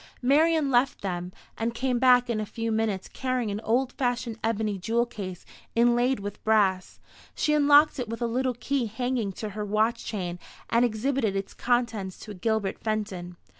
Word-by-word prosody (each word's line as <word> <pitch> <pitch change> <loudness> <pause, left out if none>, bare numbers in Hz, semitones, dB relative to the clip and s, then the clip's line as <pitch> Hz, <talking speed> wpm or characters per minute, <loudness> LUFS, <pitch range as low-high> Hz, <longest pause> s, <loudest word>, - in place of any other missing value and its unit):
Marian 305 +2 +3
left 250 +2 +2
them, 180 -2 -3 0.3
and 230 +1 -1
came 250 0 0
back 250 -1 +5
in 235 -3 -1
a - - -2
few 230 +1 -3
minutes 220 -4 -1
carrying 255 -4 -2
an 200 - -3
old 245 +4 +1
fashioned 245 -3 -2
ebony 215 -3 -1
jewel 230 +5 +1
case, 190 -6 -7 0.3
inlaid 240 +2 +3
with 205 0 -7
brass. 200 -4 +2 0.4
She 300 - +1
unlocked 295 0 +5
it 245 -3 -3
with 230 - -4
a - - +2
little 250 +2 0
key 260 0 -1
hanging 235 -1 -2
to 215 +3 -5
her 210 +1 -5
watch 215 +3 +1
chain, 180 -4 -4 0.3
and 235 +1 +4
exhibited 235 -1 0
its 195 0 -3
contents 235 -6 -1
to 210 - -8
Gilbert 205 +1 -1
Fenton. 195 -5 -3
230 Hz, 170 wpm, -27 LUFS, 205-250 Hz, 0.4 s, back